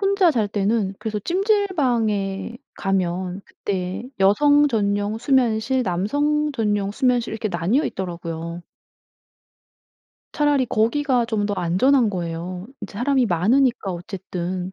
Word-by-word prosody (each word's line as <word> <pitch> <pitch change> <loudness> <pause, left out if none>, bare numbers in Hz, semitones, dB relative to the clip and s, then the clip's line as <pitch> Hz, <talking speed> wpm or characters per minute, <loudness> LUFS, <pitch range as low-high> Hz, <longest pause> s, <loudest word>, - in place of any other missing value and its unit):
혼자 395 -3 +3
잘 225 -8 0
때는 205 0 0
그래서 215 -1 -3
찜질방에 245 - 0 0.2
가면 185 0 -2
그때 190 +2 -4 0.2
여성 290 +9 +5
전용 205 -1 0
수면실 250 -1 +2
남성 290 +12 0
전용 205 -5 0
수면실 245 0 +1
이렇게 220 -1 -2
나뉘어 190 - +1
있더라고요. 170 -2 -5 1.7
차라리 290 -3 +2
거기가 245 +3 +1
좀 220 -3 -1
더 205 - -2
안전한 220 +9 +3
거예요. 180 0 -5
이제 200 - -8
사람이 260 -1 +2
많으니까 215 +4 +2
어쨌든 180 0 -5
215 Hz, 275 characters per minute, -22 LUFS, 190-265 Hz, 1.7 s, 여성